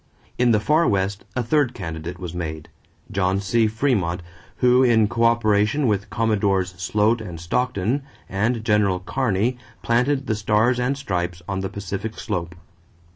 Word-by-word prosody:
In 125 Hz, 0 st, +4 dB
the 110 Hz, -2 st, +4 dB
Far 155 Hz, +9 st, +3 dB
West 100 Hz, 0 st, -1 dB
a 125 Hz, -, 0 dB
third 130 Hz, +1 st, +1 dB
candidate 80 Hz, -1 st, -6 dB
was 90 Hz, -2 st, -6 dB
made, 80 Hz, -3 st, -5 dB, 0.4 s
John 95 Hz, 0 st, +1 dB
C. 110 Hz, +3 st, +2 dB
Frémont, 105 Hz, -7 st, 0 dB, 0.3 s
who, 125 Hz, +1 st, +4 dB
in 115 Hz, -4 st, +4 dB
coöperation 115 Hz, +2 st, +2 dB
with 100 Hz, -4 st, 0 dB
Commodores 100 Hz, -4 st, +1 dB
Sloat 110 Hz, +2 st, +2 dB
and 90 Hz, -6 st, -7 dB
Stockton 120 Hz, -, 0 dB, 0.3 s
and 110 Hz, +3 st, -1 dB
General 105 Hz, -4 st, +2 dB
Kearney, 120 Hz, +3 st, -1 dB, 0.2 s
planted 130 Hz, +4 st, +1 dB
the -, -, 0 dB
Stars 105 Hz, +4 st, +2 dB
and 130 Hz, +3 st, 0 dB
Stripes 90 Hz, -8 st, -3 dB
on 95 Hz, -1 st, -2 dB
the 95 Hz, 0 st, -3 dB
Pacific 100 Hz, +3 st, -5 dB
slope. 85 Hz, -5 st, -4 dB
105 Hz, 145 wpm, -22 LUFS, 95-120 Hz, 0.4 s, In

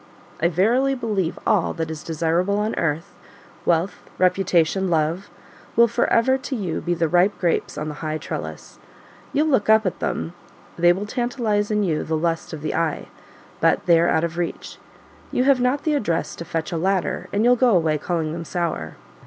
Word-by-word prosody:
I 170 Hz, -, +4 dB
verily 235 Hz, -, +2 dB
believe 205 Hz, -8 st, -2 dB
all 210 Hz, -6 st, +2 dB
that 165 Hz, -2 st, -3 dB
is 155 Hz, -1 st, -6 dB
desirable 170 Hz, +5 st, 0 dB
on 210 Hz, +1 st, -1 dB
earth 160 Hz, 0 st, -2 dB, 0.5 s
wealth, 175 Hz, +2 st, +1 dB, 0.2 s
reputation, 185 Hz, 0 st, +2 dB
love 165 Hz, +3 st, 0 dB, 0.5 s
will 235 Hz, +1 st, +6 dB
for 235 Hz, +1 st, 0 dB
ever 260 Hz, +3 st, +3 dB
to 270 Hz, 0 st, -4 dB
you 185 Hz, -8 st, -3 dB
be 175 Hz, 0 st, -1 dB
the 165 Hz, -1 st, +1 dB
ripe 180 Hz, +5 st, +3 dB
grapes 175 Hz, -2 st, 0 dB
on 150 Hz, -, -3 dB
the 150 Hz, -, -4 dB
high 155 Hz, -1 st, -2 dB
trellis: -, -, -7 dB, 0.5 s
you'll 295 Hz, +2 st, +2 dB
look 260 Hz, -9 st, +1 dB
up 220 Hz, 0 st, +5 dB
at 185 Hz, -, -2 dB
them; 165 Hz, -, -3 dB, 0.4 s
they 175 Hz, 0 st, +5 dB
will 190 Hz, +4 st, -2 dB
tantalize 230 Hz, -3 st, -1 dB
in 210 Hz, -1 st, +1 dB
you 160 Hz, -5 st, 0 dB
the 160 Hz, 0 st, -1 dB
lust 165 Hz, +1 st, -2 dB
of 155 Hz, -2 st, -7 dB
the 155 Hz, -, -2 dB
eye; 165 Hz, -2 st, -1 dB, 0.5 s
but -, -, +2 dB
they 170 Hz, -2 st, +5 dB
are 170 Hz, -, +3 dB
out 160 Hz, -, +2 dB
of 170 Hz, 0 st, -3 dB
reach: 170 Hz, -, -4 dB, 0.5 s
you 250 Hz, -, +1 dB
have 270 Hz, -1 st, +4 dB
not 255 Hz, +3 st, +1 dB
the 310 Hz, -, +1 dB
address 205 Hz, -, -1 dB
to 170 Hz, -, -6 dB
fetch 165 Hz, +1 st, -3 dB
a 170 Hz, -, -1 dB
ladder, 190 Hz, +2 st, -1 dB
and 205 Hz, +2 st, +1 dB
you'll 245 Hz, +1 st, +6 dB
go 245 Hz, -3 st, +3 dB
away 155 Hz, -3 st, +1 dB
calling 160 Hz, -1 st, -2 dB
them 170 Hz, 0 st, -5 dB
sour." 165 Hz, -, -3 dB
180 Hz, 195 wpm, -22 LUFS, 165-220 Hz, 0.5 s, will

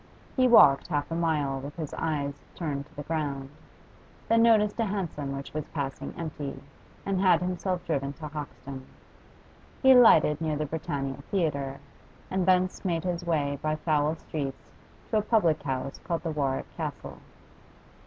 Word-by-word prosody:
He 255 Hz, -1 st, +4 dB
walked 140 Hz, -, +7 dB
half 145 Hz, -2 st, -2 dB
a -, -, -1 dB
mile 150 Hz, -5 st, 0 dB
with 140 Hz, +2 st, -8 dB
his 155 Hz, -4 st, -5 dB
eyes 145 Hz, -3 st, -2 dB
turned 145 Hz, -4 st, -3 dB
to -, -, -24 dB
the 145 Hz, -, -6 dB
ground, 140 Hz, -3 st, -3 dB, 0.8 s
then 230 Hz, 0 st, +4 dB
noticed 220 Hz, -2 st, +4 dB
a 230 Hz, -, +3 dB
hansom 175 Hz, -9 st, -3 dB
which 135 Hz, -, -8 dB
was 155 Hz, -1 st, -4 dB
passing 140 Hz, -3 st, -4 dB
empty, 150 Hz, -4 st, -5 dB, 0.5 s
and 195 Hz, -1 st, 0 dB
had 185 Hz, -4 st, +5 dB
himself 180 Hz, 0 st, -2 dB
driven 140 Hz, -4 st, -1 dB
to 155 Hz, +1 st, -7 dB
Hoxton. 140 Hz, -3 st, -8 dB, 1.0 s
He 265 Hz, -, +8 dB
alighted 165 Hz, -, +7 dB
near 155 Hz, -2 st, 0 dB
the 150 Hz, +1 st, -1 dB
Britannia 145 Hz, -3 st, -3 dB
Theatre, 140 Hz, -8 st, -1 dB, 0.5 s
and 185 Hz, -1 st, 0 dB
thence 185 Hz, 0 st, +2 dB
made 170 Hz, -4 st, 0 dB
his 175 Hz, -1 st, -2 dB
way 145 Hz, -5 st, 0 dB
by 155 Hz, 0 st, 0 dB
foul 155 Hz, -1 st, +1 dB
streets 140 Hz, -4 st, -6 dB, 0.4 s
to 220 Hz, -, +3 dB
a -, -, +3 dB
public 210 Hz, -8 st, +2 dB
house 135 Hz, 0 st, -3 dB
called 165 Hz, -2 st, -3 dB
the 165 Hz, -, -2 dB
'Warwick 140 Hz, -3 st, -2 dB
Castle. -, -, -5 dB
155 Hz, 160 wpm, -28 LUFS, 140-180 Hz, 1.0 s, He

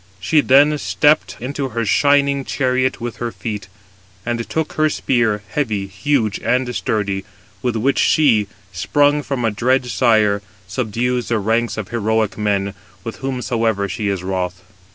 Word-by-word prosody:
She 150 Hz, -, +3 dB
then 145 Hz, +3 st, +4 dB
stepped 150 Hz, +2 st, +2 dB
into 135 Hz, +2 st, -3 dB
her 115 Hz, -1 st, -2 dB
shining 140 Hz, +4 st, +3 dB
chariot 130 Hz, -1 st, 0 dB
with 120 Hz, 0 st, -5 dB
her 120 Hz, -1 st, -3 dB
feet; 105 Hz, -6 st, -5 dB, 0.6 s
and 115 Hz, 0 st, -3 dB
took 160 Hz, -1 st, -2 dB
her 155 Hz, 0 st, +2 dB
spear, 115 Hz, -8 st, 0 dB
heavy, 110 Hz, -5 st, -1 dB
huge, 110 Hz, +2 st, 0 dB
and 125 Hz, +2 st, 0 dB
sturdy, 100 Hz, -3 st, -1 dB, 0.4 s
with 125 Hz, -2 st, -1 dB
which 130 Hz, +5 st, +1 dB
she, 115 Hz, -10 st, +3 dB, 0.3 s
sprung 145 Hz, -, +2 dB
from 135 Hz, -4 st, -2 dB
a 115 Hz, -, +2 dB
dread 125 Hz, +4 st, +1 dB
sire, 110 Hz, -5 st, +2 dB, 0.3 s
subdues 120 Hz, +4 st, -1 dB
the 115 Hz, -, +1 dB
ranks 115 Hz, +3 st, 0 dB
of 105 Hz, -5 st, -5 dB
heroic 110 Hz, -2 st, 0 dB
men, 100 Hz, -2 st, -1 dB, 0.3 s
with 115 Hz, -, -6 dB
whomsoever 115 Hz, -6 st, -1 dB
she 105 Hz, +2 st, -3 dB
is 95 Hz, -3 st, -2 dB
wroth. 90 Hz, -1 st, -3 dB
115 Hz, 150 wpm, -19 LUFS, 105-130 Hz, 0.6 s, then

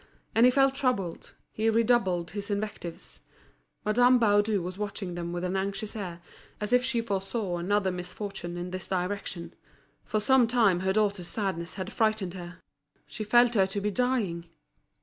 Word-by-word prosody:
And 230 Hz, +2 st, +6 dB
he -, -, +5 dB
felt 270 Hz, +1 st, +4 dB
troubled, 250 Hz, -11 st, -2 dB, 0.2 s
he 220 Hz, +1 st, +1 dB
redoubled 220 Hz, -6 st, +2 dB
his 200 Hz, 0 st, -5 dB
invectives. 205 Hz, -4 st, -5 dB, 0.6 s
Madame 245 Hz, +4 st, +5 dB
Baudu 205 Hz, -2 st, +3 dB
was 185 Hz, +2 st, -6 dB
watching 200 Hz, -3 st, -4 dB
them 170 Hz, 0 st, -4 dB
with 175 Hz, 0 st, -3 dB
an 180 Hz, +1 st, -1 dB
anxious 200 Hz, +3 st, -3 dB
air, 175 Hz, -5 st, -6 dB, 0.4 s
as 210 Hz, +3 st, -2 dB
if 250 Hz, 0 st, +5 dB
she 250 Hz, -2 st, 0 dB
foresaw 195 Hz, -2 st, -2 dB
another 190 Hz, +2 st, +1 dB
misfortune 180 Hz, 0 st, -6 dB
in 175 Hz, +1 st, -5 dB
this 185 Hz, -1 st, -5 dB
direction. 185 Hz, -1 st, -3 dB, 0.5 s
For 215 Hz, -, -1 dB
some 250 Hz, +2 st, +4 dB
time 220 Hz, -7 st, +3 dB
her 190 Hz, +1 st, 0 dB
daughter's 200 Hz, -4 st, +1 dB
sadness 185 Hz, -5 st, -3 dB
had 185 Hz, -2 st, -5 dB
frightened 215 Hz, -5 st, +1 dB
her, 175 Hz, -1 st, -8 dB, 0.5 s
she 215 Hz, -, -6 dB
felt 240 Hz, +3 st, +5 dB
her 195 Hz, -4 st, +4 dB
to 195 Hz, +1 st, -3 dB
be 210 Hz, +1 st, -1 dB
dying. 215 Hz, -8 st, 0 dB
200 Hz, 165 wpm, -28 LUFS, 180-225 Hz, 0.6 s, And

